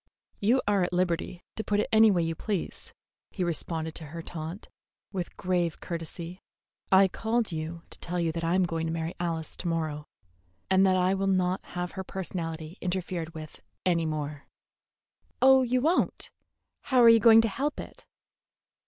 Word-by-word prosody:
"You 235 +6 +3
are 205 -2 +3
at 180 0 -1
liberty 175 0 -1
to 220 - -3
put 205 -1 0
it 210 - +1
any 220 0 +7
way 180 -4 +2
you 165 0 -1
please," 195 +3 -4 0.4
he 185 - -3
responded 160 -1 -2
to 160 - -7
her 165 +3 -7
taunt, 165 +5 -7 0.4
with 185 -3 -5
grave 175 -3 0
courtesy. 170 +1 -6 0.5
"I 190 0 +7
called 225 +2 -1
you 165 +1 -5
to - - -5
tell 175 +1 -3
you 165 -1 +1
that 165 +1 -4
I 165 +2 +1
am 190 - +3
going 165 -2 -1
to - - -2
marry 165 0 -3
Alice 165 -2 -3
to - - -5
morrow, 155 -3 -2 0.6
and 190 0 +5
that 185 0 +3
I 185 +1 +3
will 195 0 0
not 185 -1 +1
have 180 0 -2
her 190 - -5
personality 170 -3 -5
interfered 175 -2 -3
with 155 -1 -9 0.2
any 170 -3 +2
more." 150 -2 -4 0.9
"Oh, 265 0 +7
you 250 0 +1
won't? 330 +6 +1 0.5
How 255 -3 +4
are - - +8
you 230 0 +8
going 225 0 +8
to 225 - +1
help 275 +8 -2
it?" - - -10
180 Hz, 180 wpm, -28 LUFS, 165-195 Hz, 0.9 s, are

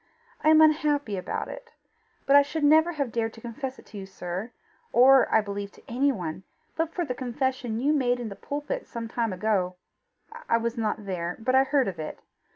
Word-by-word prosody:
I 310 - +5
am 315 0 +7
unhappy 295 -7 +3
about 185 -1 -4
it. - - -10 0.5
But 275 - +4
I 285 - +9
should 295 +2 -3
never 315 +4 +5
have 280 -6 -2
dared 225 0 -1
to 225 - -13
confess 255 +3 -6
it - - -16
to 210 - -9
you, 190 - -8
sir, 190 +4 -6 0.4
or, 265 +2 +6
I 220 - +5
believe, 200 -1 -5
to - - -19
anyone, 230 - -1 0.3
but 325 0 -1
for 350 0 -2
the 250 - -3
confession 250 -2 -2
you 285 +5 +2
made 250 -4 +1
in 235 -2 -4
the 200 - -8
pulpit 295 - -5
some 230 -1 -5
time 230 -1 -1
ago. 185 -1 0 0.7
I 230 - +4
was 230 +1 -2
not 215 -2 -2
there, 175 -2 -3
but 250 +3 -1
I 265 +1 +5
heard 275 -2 +2
of 180 -4 -5
it. 155 - -5
245 Hz, 205 wpm, -26 LUFS, 210-285 Hz, 0.7 s, I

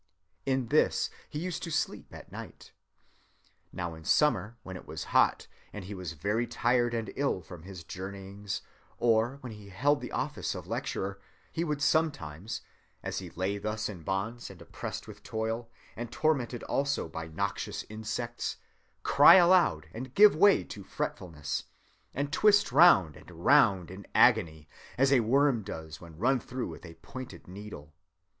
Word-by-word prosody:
In 130 -3 0
this 155 - +2 0.2
he 150 - -6
used 180 +3 -3
to 170 - -4
sleep 160 -1 -2
at - - -12
night. - - -10 1.0
Now 85 -2 -4
in 80 0 -11
summer, 120 - +2
when 95 - -7
it 90 - -10
was - - -5
hot, - - +4 0.3
and 100 -3 -7
he 100 - -6
was 90 -4 -5
very 105 +9 -1
tired 120 0 +1
and 115 -2 -3
ill 135 -10 0
from 85 -1 -11
his 90 -1 -9
journeyings, 95 +2 -6 0.3
or 115 +2 +2
when 125 - -7
he 105 -2 -11
held 140 +9 +2
the - - -6
office - - -2
of - - -7
lecturer, 100 +1 -3 0.3
he 165 - -1
would 150 -3 -2
sometimes, 110 - 0 0.4
as - - -3
he - - -8
lay 95 +3 -2
thus 105 +1 -2
in 95 -5 -8
bonds, 100 +7 -3
and - - -12
oppressed - - -7
with - - -11
toil, 115 +1 -3 0.3
and 120 0 -6
tormented 130 -6 0
also 140 -8 0
by 80 0 -6
noxious 95 +5 -3
insects, 110 +2 -4 0.5
cry - - +8
aloud 175 - +5
and 125 +3 -7
give 210 -3 +8
way 200 +4 +5
to 100 - -9
fretfulness, 75 -6 -4 0.5
and 140 +2 -2
twist 205 +1 +4
round 95 - +6
and - - -14
round 90 -4 +3
in 95 +1 -10
agony, 80 -2 +4 0.3
as 135 +2 +4
a 130 - +6
worm 130 +1 +3
does 80 -5 -8
when 85 -2 -12
run 125 +7 +2
through 125 +1 -5
with - - -9
a 80 - -12
pointed 130 -10 -9
needle. 90 -6 -9
110 Hz, 165 wpm, -30 LUFS, 95-135 Hz, 1.0 s, cry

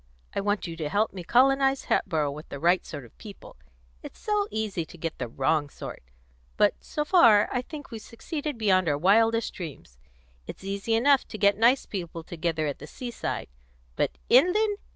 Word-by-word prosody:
I - - 0
want 205 +1 -1
you 165 -2 -6
to 155 -2 -3
help 210 +7 +1
me 185 -2 -7
colonise 270 +5 +3
Hatboro' 150 -3 0
with 150 +2 -10
the 140 - -7
right 175 +4 +3
sort 145 -5 -7
of 115 - -19
people: 205 -2 -12 0.5
it's - - -11
so 420 -1 0
easy 215 -6 -2
to 165 - -14
get 165 0 -5
the 125 - -3
wrong 140 +5 0
sort! - - -8 0.6
But, - - +4
so 300 - -3
far, 235 - +6
I 250 - 0
think 290 +1 -10
we've 225 -2 -7
succeeded 295 +5 -5
beyond 185 -5 +2
our 145 - +1
wildest 225 +7 +3
dreams. 140 - -9 0.5
It's - - -9
easy 200 +3 -1
enough 270 +4 +3
to 215 - -7
get 200 -1 +4
nice 235 +5 +3
people 170 -4 -6
together 165 -1 -2
at 145 -2 -3
the - - -9
seaside; 240 - -5 0.5
but - - -1
inland! 400 - +4
205 Hz, 185 wpm, -26 LUFS, 165-250 Hz, 0.6 s, far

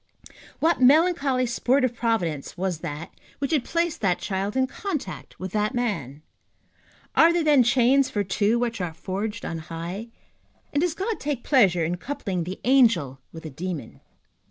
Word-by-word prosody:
What 330 -3 +2
melancholy 280 -2 +4
sport 255 +3 +1
of 250 - -1
Providence 185 - -2
was 180 -3 -2
that 150 +1 -6 0.3
which 275 - -3
had 300 -6 +2
placed 335 -1 -1
that 185 -4 +2
child 200 +3 -3
in 260 - +3
contact 285 - -6
with 185 0 -5
that 210 +4 0
man? 160 - -3 0.9
Are 330 +1 +7
there 340 -1 +1
then 295 -4 +5
chains 255 +3 +4
for 205 - -1
two 205 +4 +1
which 235 -4 -2
are 170 -3 -4
forged 210 +6 -4
on 165 - -4
high? 170 +7 -6 0.7
and 290 - +2
does 345 -2 0
God 415 +4 -2
take 280 -4 -3
pleasure 190 - +4
in 175 +2 -2
coupling 190 - -3
the 185 +2 -6
angel 220 - +3
with 160 - -10
the 155 - -7
demon? 160 -4 -6
225 Hz, 165 wpm, -25 LUFS, 175-275 Hz, 0.9 s, Are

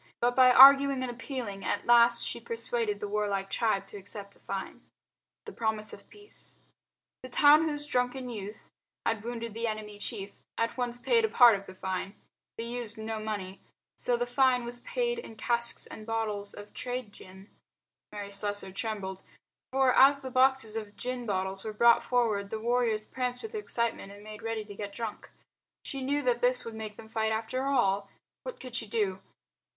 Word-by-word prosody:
But 245 +1 +1
by 255 0 +7
arguing 275 +1 +8
and 250 - -2
appealing 240 -5 -6
at 205 - -1
last 235 0 +6
she - - -3
persuaded 460 -2 -2
the - - -4
warlike 200 -2 -1
tribe 215 -4 +1
to 205 - -8
accept 200 0 -7
a - - -23
fine. 195 -1 -6 0.6
The 430 - -8
Promise 220 -1 -2
of - - -13
Peace 415 0 -11 0.6
The 255 - -9
town 295 +4 +6
whose 295 -1 -3
drunken 250 -1 -1
youth 210 -3 -8 0.3
had 225 -2 0
wounded 230 -1 -5
the 230 +1 -2
enemy 215 -1 -5
chief 205 -2 -4 0.2
at 230 0 0
once 245 -1 -2
paid 460 - +2
a 445 - +2
part 240 - +7
of 195 0 -7
the 185 - -10
fine. 190 +1 -4 0.4
They 230 - -3
used 235 -2 -3
no 220 0 -4
money. 205 -3 -5 0.3
So 245 - 0
the 245 - 0
fine 250 0 +2
was 240 0 -4
paid 480 - -1
in 225 - -10
casks 235 +1 0
and 215 - -10
bottles 215 -2 -3
of 205 0 -11
trade 250 -4 -4
gin. 190 +2 -14 0.6
Mary 205 -1 -6
Slessor 205 -1 -2
trembled. 195 -2 -4 0.5
For 265 -1 +3
as 280 +1 +6
the 260 - -5
boxes 260 -3 +3
of 210 -2 -5
gin 250 -1 -4
bottles 190 -1 -1
were 220 - -5
brought 235 +2 +5
forward 220 -5 0
the 220 - -4
warriors 230 -2 +1
pranced 250 0 -3
with 445 0 -7
excitement 235 - -2
and 205 +1 -13
made 215 0 -9
ready 225 -1 -3
to 205 - -9
get 200 0 -6
drunk. 225 -1 -6 0.6
She 275 - -4
knew 285 +2 0
that 245 -1 +1
this 250 0 +2
would 230 - -6
make 215 -1 -7
them 220 - -11
fight 220 0 -1
after 225 +4 -2
all. 200 -8 +1 0.3
What - - -7
could 255 -2 -9
she 225 -2 -1
do? 200 -3 -1
230 Hz, 185 wpm, -29 LUFS, 205-255 Hz, 0.6 s, arguing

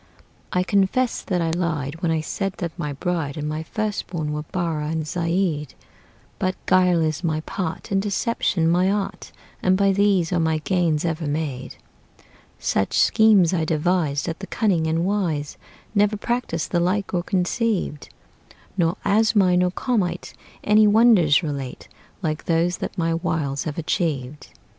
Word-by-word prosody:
I 180 - +1
confess 200 +6 +1
that 180 -3 -1
I 165 - 0
lied 165 -3 -2
When 170 - 0
I 160 -1 +1
said 195 +4 -3
that 170 -3 -4
my 150 -5 -4
bride 160 -1 -2
And 150 0 -3
my 155 +1 -3
first 215 +5 -3
born 155 -4 -3
were 150 - -2
Barrah 160 -2 -3
and 160 -1 -2
Zeid; 165 -2 -1 0.6
But 185 0 0
guile 180 -3 +4
is 155 +2 -2
my 155 -2 0
part, 160 +2 -5
And 195 0 +2
deception 200 -4 0
my 180 +3 +3
art, 200 0 -3 0.3
And 185 0 +3
by 200 0 +3
these 195 -3 +2
are 175 - +2
my 160 -1 +1
gains 165 -1 0
ever 160 -1 -2
made. 145 -3 -3 0.8
Such 95 - 0
schemes 210 -6 +5
I 165 -3 +1
devise 155 -2 0
That 165 -1 -4
the 195 - -7
cunning 180 -8 +1
and 165 +2 0
wise 170 -8 -1 0.4
Never 210 0 +2
practiced 235 -7 -2
the 175 - +2
like 190 +3 0
or 175 - +1
conceived; 185 - -1 0.7
Nor 170 -3 +1
Asmai 205 -3 +3
nor 180 0 +3
Komait 185 -4 -2 0.3
Any 210 +1 +5
wonders 205 -8 +5
relate 140 -4 -5 0.4
Like 155 -2 -2
those 170 +1 +1
that - - -5
my 165 -1 +1
wiles 150 -4 -2
have 150 -2 -4
achieved. 150 -4 -2
175 Hz, 155 wpm, -23 LUFS, 155-195 Hz, 0.8 s, schemes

